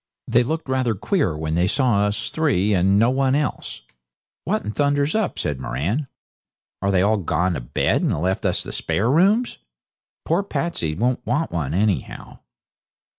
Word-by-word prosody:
They 120 - +4
looked 155 +6 -2
rather 130 -4 0
queer 95 - 0
when 80 0 -3
they 85 +2 +2
saw 105 -3 +2
us 105 0 -3
three 115 - +1
and 95 +1 +3
no 115 +4 +4
one 135 0 +2
else. 145 - -3 0.6
'What - - -1
in 105 - -2
thunder's 145 +3 +1
up?' 220 -2 -1
says 70 -3 -2
Moran. 85 - -2 0.7
'Are 100 - 0
they 95 -2 +3
all 110 +2 +3
gone 90 0 0
to 70 - -4
bed, - - 0
and - - 0
left 95 +3 -1
us - - 0
the - - -7
spare 115 +6 0
rooms? 200 - +2 0.7
Poor 170 +4 +2
Patsey 170 - -2
won't 125 +6 0
want 130 +8 -1
one, 80 -3 -2
anyhow.' 100 -1 -2
110 Hz, 170 wpm, -22 LUFS, 90-145 Hz, 0.7 s, They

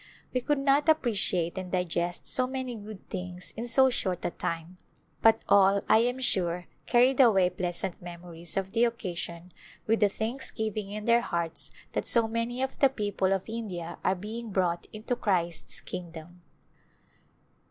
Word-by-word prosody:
We 255 - +1
could 295 +4 +1
not 275 +2 +3
appreciate 200 - +1
and 185 -1 -7
digest 175 -1 -1
so 255 -1 +2
many 260 -1 -3
good 210 -2 -10
things 180 -1 -5
in 230 +2 -4
so 265 +2 +5
short 185 -7 -1
a - - 0
time, 170 +2 -4 0.4
but 225 0 +5
all, 200 0 +5
I 220 - +6
am 245 +2 +1
sure, 180 -7 +1 0.2
carried 250 +2 +4
away 195 -8 +5
pleasant 180 0 -3
memories 175 -1 -6
of 195 0 -1
the 230 +1 +3
occasion, 180 -6 -4 0.3
with 225 +1 +1
a 205 - +5
thanksgiving 220 -2 -2
In 210 +1 -5
their 235 0 +5
hearts 170 -7 -3 0.2
that - - -2
so 230 -2 +4
many 230 +3 -2
of 265 - -4
the 275 - +6
people 205 -6 -1
of 195 -1 +1
India 200 -7 -5
are 185 - +2
being 220 +5 -6
brought 180 -3 0
Into 220 +3 -3
Christ's 175 -7 -1
kingdom. 175 0 -8
200 Hz, 160 wpm, -28 LUFS, 180-235 Hz, 0.4 s, I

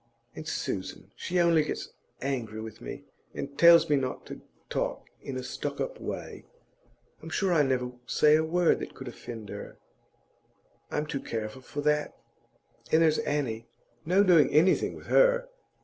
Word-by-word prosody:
And 155 - -8
Susan, 95 -10 -4
she 180 +1 -1
only 170 -2 +4
gets 150 - -4 0.3
angry 120 -6 -3
with 110 -1 -8
me, - - -7 0.3
and 140 0 -5
tells 170 +2 +7
me 150 - +3
not 130 -1 -3
to - - -9 0.3
talk - - -2 0.2
in 130 - -5
a 130 - -4
stuck 125 - -4
up - - -4
way. - - -6 0.8
I'm - - -8
sure 190 -3 +1
I 160 - +5
never 130 -3 0 0.2
say 150 0 +5
a 160 - +3
word 170 +1 +2
that - - -7
could 130 - -9
offend 115 -3 -8
her; - - -8 1.1
I'm 150 - -1
too 150 -2 -3
careful 110 +2 -5
for 145 +3 -5
that. 150 0 0 0.7
And 160 +1 +5
there's 155 -1 +3
Annie; 120 -6 -2 0.4
no 185 +5 +4
doing 170 -8 +6
anything 160 +6 +3
with - - -12
her! - - +4
150 Hz, 165 wpm, -28 LUFS, 130-170 Hz, 1.1 s, tells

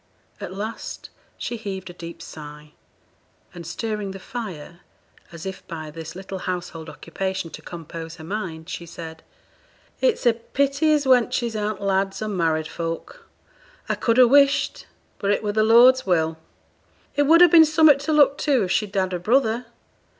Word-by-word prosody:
At 200 -3 -6
last 210 +4 -6 0.3
she 240 - -4
heaved 190 -4 -6
a - - -14
deep 170 -1 -9
sigh, 150 -1 -11 0.8
and 170 -2 -9
stirring 210 +3 -3
the 195 0 -7
fire, 180 - -7 0.5
as 170 0 -9
if 190 0 -7
by 155 -3 -7
this 165 +1 -8
little 190 0 -7
household 175 -3 -5
occupation 190 0 -4
to - - -9
compose 165 -1 -8
her 160 - -12
mind, 165 -3 -5
she 170 - -6
said 160 -1 -9 0.8
'It's - - +1
a 240 - +6
pity 280 +6 0
as 295 -2 +2
wenches 240 -2 +2
aren't 210 -1 -2
lads, 195 0 0
or 215 - -3
married 165 -5 0
folk. 170 - -6 0.6
I - - 0
could 230 0 0
ha' 250 -1 +8
wished 280 +2 +3 0.3
but 200 - -1
it 205 - +1
were 210 - 0
the 215 - +2
Lord's 240 +4 +6
will 160 -3 0 0.8
It 290 -1 +2
would 335 +3 +7
ha' 355 - +6
been 335 -2 +9
summut 310 -2 +5
to 290 +3 -3
look 290 -2 +4
to, 270 -7 +2
if 185 - -2
she'd 205 0 -1
had 185 -1 0
a 180 - -2
brother. 230 +3 +1
195 Hz, 170 wpm, -23 LUFS, 170-245 Hz, 0.8 s, been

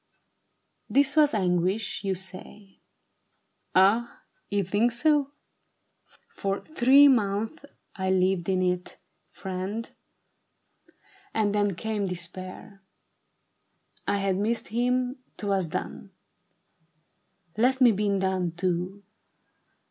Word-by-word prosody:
" - - -48
This 280 +1 +4
was 300 -5 +4
anguish, 185 +2 0
you 195 -1 0
say. 190 +2 -8 1.0
Ah, 210 +6 +3 0.3
you 200 0 0
think 205 +6 +1
so? 285 +3 +2 1.0
For 195 0 -3
three 280 -1 +5
months 225 +3 0 0.3
I 190 -1 -2
lived 185 -1 +1
in 185 -1 +1
it, 180 0 -2 0.3
friend, 190 +5 -5 1.5
And 210 -2 +1
then 205 -2 +1
came 215 +1 -2
despair. 185 +3 -6 1.3
I 205 - +1
had 195 -1 0
missed 225 +4 -1
him 250 +2 0
— - - -41
'twas 195 -4 0
done: 70 - -5 1.5
Let 255 +5 +2
me 250 -3 +7
be 205 0 0
done, 190 -3 -1
too. 180 +2 -2
200 Hz, 100 wpm, -26 LUFS, 185-230 Hz, 1.5 s, me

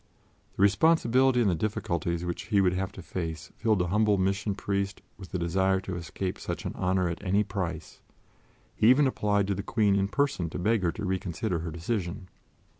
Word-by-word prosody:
The 95 - +2
responsibility 130 +2 +4
and 105 - +3
the - - +1
difficulties 85 -2 -2
which 85 -1 -4
he 105 -3 +2
would 90 -2 +3
have 95 0 -2
to 95 - -9
face 80 -4 -5
filled 110 -3 +1
the 90 -1 0
humble 105 +1 +3
Mission 100 +2 0
Priest 100 0 -2 0.2
with 95 -3 -11
the - - -3
desire 95 +2 +1
to 95 -1 -5
escape 90 +2 -4
such - - -5
an - - -3
honor 95 0 +1
at 85 +3 -5
any 100 +2 +2
price; 90 -6 -5 0.7
he 110 - +4
even 140 +3 +6
applied 105 -6 +1
to 100 - 0
the 100 - -3
Queen 105 -1 +2
in 100 0 +2
person 135 - 0
to - - -6
beg 110 +4 +1
her 85 -2 +1
to 105 - -5
reconsider 95 0 -2
her 85 +1 -4
decision. 90 +2 -4
95 Hz, 195 wpm, -28 LUFS, 90-105 Hz, 0.7 s, even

